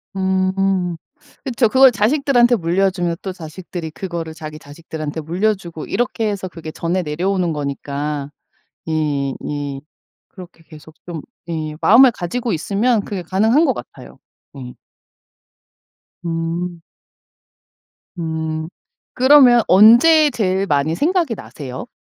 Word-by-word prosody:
음. 190 Hz, -1 st, 0 dB, 0.5 s
그쵸 250 Hz, -3 st, +1 dB
그걸 265 Hz, +2 st, +6 dB
자식들한테 245 Hz, +1 st, +3 dB
물려주면 175 Hz, -1 st, 0 dB
또 190 Hz, -, -5 dB
자식들이 170 Hz, -1 st, -8 dB
그거를 170 Hz, -2 st, -6 dB
자기 155 Hz, -1 st, -9 dB
자식들한테 155 Hz, +1 st, -7 dB
물려주고 175 Hz, 0 st, -2 dB
이렇게 230 Hz, -2 st, -1 dB
해서 195 Hz, -2 st, -4 dB
그게 165 Hz, -3 st, -9 dB
전해 170 Hz, +3 st, -2 dB
내려오는 175 Hz, +3 st, -1 dB
거니까. 145 Hz, 0 st, -4 dB, 0.6 s
예 145 Hz, -4 st, -1 dB, 0.2 s
예. 145 Hz, -2 st, -4 dB, 0.5 s
그렇게 180 Hz, -3 st, -14 dB
계속 155 Hz, -1 st, -15 dB
좀 170 Hz, -3 st, -6 dB, 0.3 s
예 155 Hz, -2 st, -4 dB
마음을 260 Hz, +7 st, +7 dB
가지고 230 Hz, +5 st, -3 dB
있으면 205 Hz, +7 st, +1 dB
그게 195 Hz, -3 st, -4 dB
가능한 220 Hz, -, +2 dB
것 -, -, +2 dB
같아요. -, -, -11 dB, 0.4 s
예. 125 Hz, -2 st, -8 dB, 1.5 s
음. 170 Hz, +1 st, -3 dB, 1.4 s
음. 160 Hz, -1 st, -3 dB, 0.5 s
그러면 255 Hz, -2 st, +6 dB
언제 240 Hz, -, +7 dB
제일 195 Hz, -6 st, -1 dB
많이 145 Hz, 0 st, +1 dB
생각이 330 Hz, -, +1 dB
나세요? 130 Hz, -9 st, -8 dB
175 Hz, 255 characters per minute, -19 LUFS, 160-215 Hz, 1.5 s, 마음을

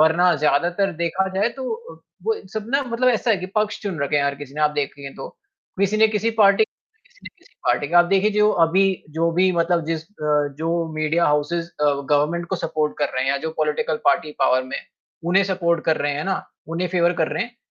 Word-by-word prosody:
वरना 170 Hz, +3 st, +4 dB
ज़्यादातर 175 Hz, +6 st, +1 dB
देखा 170 Hz, +3 st, 0 dB
जाए 205 Hz, +4 st, +2 dB
तो 265 Hz, -, -5 dB, 0.3 s
व -, -, -20 dB, 0.3 s
वो 445 Hz, -, +2 dB, 0.2 s
सब 215 Hz, -1 st, -4 dB, 0.2 s
मतलब 245 Hz, +2 st, +1 dB
ऐसा 235 Hz, 0 st, +1 dB
है 210 Hz, -, +4 dB
कि 185 Hz, -, -5 dB
पक्ष 210 Hz, 0 st, +1 dB
चुन 195 Hz, -6 st, -4 dB
रखा 140 Hz, +1 st, 0 dB
है 140 Hz, -, +2 dB
हर 140 Hz, 0 st, 0 dB
किसी 140 Hz, -1 st, -11 dB
ने 155 Hz, -, -4 dB
आप 150 Hz, -, +4 dB
देखेंगे 140 Hz, -1 st, -4 dB
तो। 135 Hz, -, -7 dB, 0.5 s
किसी 200 Hz, +2 st, +2 dB
न 220 Hz, -, +7 dB
किसी 220 Hz, +2 st, +1 dB
पार्टी 200 Hz, +1 st, +6 dB
किसी 445 Hz, -, -31 dB
न -, -, -4 dB
किसी -, -, -25 dB
पार्टी 145 Hz, -, +1 dB
का, 175 Hz, +1 st, +5 dB
आप 175 Hz, -, +7 dB
देखिए, 195 Hz, +3 st, +2 dB
जो 210 Hz, 0 st, +3 dB, 0.2 s
अभी 190 Hz, +4 st, +3 dB, 0.3 s
जो 165 Hz, +2 st, 0 dB
भी 185 Hz, +2 st, +3 dB
मतलब 170 Hz, -1 st, +1 dB
जिस 160 Hz, -1 st, -2 dB
अ, 150 Hz, -6 st, -1 dB
जो 165 Hz, 0 st, -1 dB
मीडिया 155 Hz, +2 st, +1 dB
हाउसेज़ 150 Hz, +3 st, 0 dB
अ, 150 Hz, -, -4 dB, 0.3 s
गवर्मेंट 155 Hz, +4 st, +1 dB
को 190 Hz, -, -2 dB
सपोर्ट 155 Hz, -2 st, -2 dB
कर 145 Hz, -, +1 dB
रहे 130 Hz, +1 st, 0 dB
हैं 135 Hz, -, +1 dB
या 140 Hz, -, +1 dB
जो -, -, -2 dB
पॉलिटिकल 155 Hz, 0 st, 0 dB
पार्टी 150 Hz, +2 st, +2 dB
पावर 130 Hz, 0 st, +3 dB
में 130 Hz, -, -5 dB
है, -, -, -11 dB, 0.4 s
उन्हें 190 Hz, +3 st, +3 dB
सपोर्ट 170 Hz, -3 st, 0 dB
कर 160 Hz, -, +2 dB
रहे 145 Hz, 0 st, 0 dB
हैं 150 Hz, +2 st, -3 dB
ना, 190 Hz, 0 st, -2 dB, 0.2 s
उन्हें 175 Hz, +2 st, -2 dB
फ़ेवर 175 Hz, 0 st, +2 dB
कर 155 Hz, -, 0 dB
रहे -, -, 0 dB
हैं। 240 Hz, 0 st, -14 dB
170 Hz, 230 wpm, -22 LUFS, 150-195 Hz, 0.5 s, न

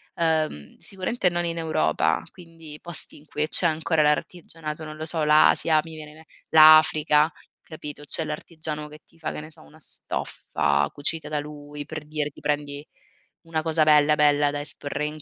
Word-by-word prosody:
uhm, 155 Hz, -, -1 dB
sicuramente 195 Hz, +1 st, -2 dB
non 175 Hz, 0 st, -2 dB
in 170 Hz, 0 st, -4 dB
Europa, 80 Hz, -, 0 dB
quindi 165 Hz, -4 st, -13 dB
posti 175 Hz, -2 st, -10 dB
in 150 Hz, -, -18 dB
cui 150 Hz, 0 st, -2 dB
c'è 170 Hz, -, +7 dB
ancora 160 Hz, 0 st, 0 dB
l'artigianato, 155 Hz, +1 st, -2 dB
non 155 Hz, 0 st, -9 dB
lo 155 Hz, -, -5 dB
so, 160 Hz, -1 st, -1 dB
l'Asia, 155 Hz, +1 st, +4 dB
mi 160 Hz, -1 st, -11 dB
viene 155 Hz, -1 st, -10 dB
in 155 Hz, -, -17 dB
me 160 Hz, -, -17 dB, 0.2 s
l'Africa, 155 Hz, -1 st, +6 dB, 0.3 s
capito? 150 Hz, -2 st, -10 dB
C'è 155 Hz, +2 st, +1 dB
l'artigiano 155 Hz, 0 st, -6 dB
che 150 Hz, +1 st, -13 dB
ti 165 Hz, -, -27 dB
fa, 160 Hz, -, -4 dB
che -, -, -7 dB
ne 155 Hz, -, -12 dB
so, -, -, -18 dB
una 75 Hz, -, -19 dB
stoffa 70 Hz, 0 st, -2 dB
cucita 150 Hz, +1 st, 0 dB
da 150 Hz, -1 st, -2 dB
lui, 145 Hz, 0 st, -9 dB
per 155 Hz, -1 st, -7 dB
dirti 150 Hz, -1 st, -4 dB
prendi 145 Hz, 0 st, -3 dB, 0.6 s
una 165 Hz, -1 st, -3 dB
cosa 160 Hz, 0 st, +1 dB
bella, 150 Hz, 0 st, +4 dB
bella 145 Hz, -1 st, +3 dB
da 145 Hz, -, -4 dB
esporre 145 Hz, 0 st, -5 dB
in 150 Hz, 0 st, -6 dB
155 Hz, 180 wpm, -24 LUFS, 150-160 Hz, 0.6 s, c'è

